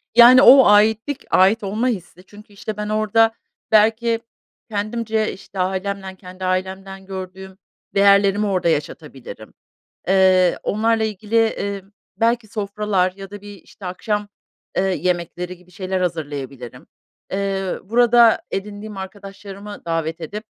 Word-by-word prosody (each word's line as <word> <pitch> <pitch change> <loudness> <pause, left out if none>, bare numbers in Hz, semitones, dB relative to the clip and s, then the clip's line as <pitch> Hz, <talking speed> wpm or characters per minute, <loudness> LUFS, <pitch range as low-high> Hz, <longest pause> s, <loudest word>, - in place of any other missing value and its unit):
Yani, 245 +2 +9
o 265 -1 +9
aitlik, 220 +6 +3
ait 200 +5 +4
olma 215 +6 -1
hissi 180 -5 -5
çünkü, 210 +1 -16
işte, 210 +1 -6
ben 210 0 -4
orada 215 +1 +2 0.4
belki 225 +2 +3 0.5
kendimce, 220 +1 -2
işte, 195 0 -11
ailemden, 190 +1 -3
kendi 185 0 -9
ailemden 190 +1 -3
gördüğüm 190 0 -8 0.4
değerlerimi 200 +1 +4
orada 185 -3 +1
yaşatabilirim. 140 -8 -5 0.6
Eee, 185 -2 +4
onlarla 225 +1 +1
ilgili, 215 +1 -3
eee, 200 -3 0 0.3
belki 230 0 +1
sofralar 200 -3 -1
ya 195 0 -10
da 205 -1 -9
bir, 205 0 -11
işte, 195 - -12
akşam, 210 +3 -3 0.5
ııı, 190 0 +2
yemekleri 180 0 -2
gibi 180 0 -22
şeyler 185 +1 -3
hazırlayabilirim. 140 -7 -5 0.5
Eee, 195 -1 -2
burada 235 +1 +4
edindiğim 205 +1 -6
arkadaşlarımı 200 +1 -9
davet 165 0 -2
edip 205 +7 -6
200 Hz, 120 wpm, -20 LUFS, 185-215 Hz, 0.6 s, Yani